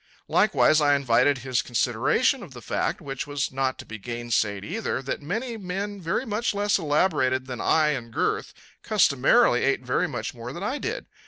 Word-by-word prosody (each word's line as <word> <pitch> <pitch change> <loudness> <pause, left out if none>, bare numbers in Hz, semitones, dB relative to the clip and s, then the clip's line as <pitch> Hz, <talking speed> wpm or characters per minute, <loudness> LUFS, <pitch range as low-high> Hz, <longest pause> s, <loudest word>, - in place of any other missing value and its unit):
Likewise, 155 0 +4
I 145 -1 +4
invited 140 +1 +3
his 125 0 -1
consideration 125 - +1
of 165 - -10
the 120 - -9
fact, 185 - -2
which 135 -2 -5
was 145 -1 -2
not 130 0 -1
to - - -9
be 110 0 -8
gainsaid 115 -3 -2
either, 210 +6 -2
that 135 +2 -4
many 225 - -3
men 200 +1 -4
very 170 +9 -1
much 215 -1 -1
less 205 0 +2
elaborated 145 -5 +1
than 125 -2 -6
I 155 -1 +3
in 125 -6 -3
girth 110 - -1 0.3
customarily - - +3
ate - - +1
very - - +1
much - - -4
more 120 +1 -8
than 175 - -6
I 260 +8 -2
did. 475 +3 -4
145 Hz, 180 wpm, -25 LUFS, 125-200 Hz, 0.3 s, Likewise